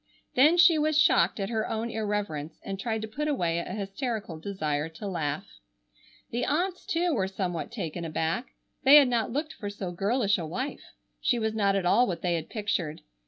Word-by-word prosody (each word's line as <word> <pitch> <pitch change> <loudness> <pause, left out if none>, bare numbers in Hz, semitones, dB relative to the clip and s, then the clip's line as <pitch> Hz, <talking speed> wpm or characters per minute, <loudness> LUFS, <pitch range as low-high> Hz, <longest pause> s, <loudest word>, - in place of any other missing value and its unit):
Then 300 +7 +5
she 345 -2 +7
was 305 0 +2
shocked 180 - +4
at 195 +3 -2
her 220 -1 -1
own 225 +1 -2
irreverence 205 -8 -3
and 195 -1 -5
tried 220 0 -2
to - - -3
put 295 +8 -3
away 170 - 0
a 170 - -5
hysterical 200 - -4
desire 155 -5 -2
to 165 +6 -9
laugh. 155 -6 -2 0.9
The 240 - -1
aunts, 360 +6 -1
too, 350 -3 +1
were 195 -7 +1
somewhat 185 -3 -3
taken 170 +1 -4
aback. 165 +8 -1 0.4
They 275 +1 +8
had 285 -4 +8
not 230 -3 0
looked 300 +5 -2
for 205 - -6
so 200 -3 -5
girlish 200 +3 +1
a 165 - -3
wife. 255 - -5 0.3
She 245 - +2
was 220 -1 -1
not 200 -2 +2
at 195 -2 0
all 245 +7 +4
what 175 - -4
they 175 -1 +1
had 165 -2 -3
pictured. 190 -8 -2
205 Hz, 195 wpm, -28 LUFS, 175-250 Hz, 0.9 s, They